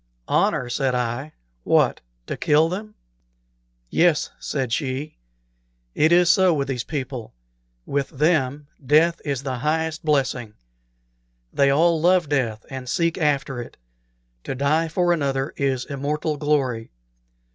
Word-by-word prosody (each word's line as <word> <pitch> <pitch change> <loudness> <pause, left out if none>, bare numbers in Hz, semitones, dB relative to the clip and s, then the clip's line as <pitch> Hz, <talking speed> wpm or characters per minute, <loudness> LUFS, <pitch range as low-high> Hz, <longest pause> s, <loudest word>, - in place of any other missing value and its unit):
"Honor!" 125 - +1
said 130 +1 0
I. 125 +5 -3 0.3
"What! - - +2 0.2
to - - -4
kill 155 +2 +3
them?" 210 +4 -6 1.0
"Yes," 170 -3 +2
said 130 -5 -2
she; 135 - -3 0.7
"it 160 +2 +3
is 175 0 +5
so 180 0 +5
with 140 -1 -1
these 125 -3 -2
people; 130 - -5 0.5
with 140 -1 -1
them 145 -1 +1 0.2
death 155 +5 +3
is 140 -3 -3
the 130 -2 -3
highest 160 +2 -1
blessing. 130 -7 0 1.0
They 140 -1 +3
all 160 +3 +3
love 175 -2 +3
death 120 -7 -1
and 130 -2 -6
seek 170 +1 0
after 140 -4 0
it. 120 - -11 0.7
To - - -3
die 150 +5 +1
for 175 +2 +1
another 140 -3 -1
is 135 -2 -1
immortal 150 +2 -2
glory. 135 -6 0
145 Hz, 130 wpm, -23 LUFS, 130-160 Hz, 1.0 s, is